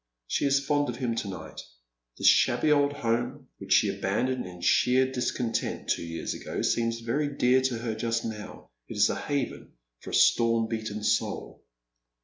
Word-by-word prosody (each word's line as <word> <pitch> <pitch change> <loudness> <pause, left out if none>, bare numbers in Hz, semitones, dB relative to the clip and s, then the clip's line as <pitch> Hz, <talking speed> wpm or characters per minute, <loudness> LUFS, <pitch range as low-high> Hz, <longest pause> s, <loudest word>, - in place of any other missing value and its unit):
She 100 - 0
is 140 0 +2
fond 145 -1 +1
of 120 - -3
him 120 -2 -2
to 105 - -2
night. 95 -2 -7 0.6
This - - -4
shabby 155 - +4
old 145 -1 +4
home, 125 +1 -2
which 95 +1 +3
ehe 100 -1 -1
abandoned 125 +5 -1
in 90 -1 -11
sheer 130 +7 +3
discontent 125 -2 -2
two - - 0
years 85 -1 -4
ago, - - -5
seems 115 0 0
very 135 +6 -1
dear 125 +1 +4
to 130 -2 0
her 115 -1 -3
just 115 +1 -2
now. 105 - -8 0.2
It - - -7
is - - +4
a - - -2
haven 140 -3 -3 0.3
for - - -10
a - - -1
storm 115 -1 +4
beaten 110 -2 -4
soul. - - -1
120 Hz, 175 wpm, -27 LUFS, 110-130 Hz, 0.6 s, shabby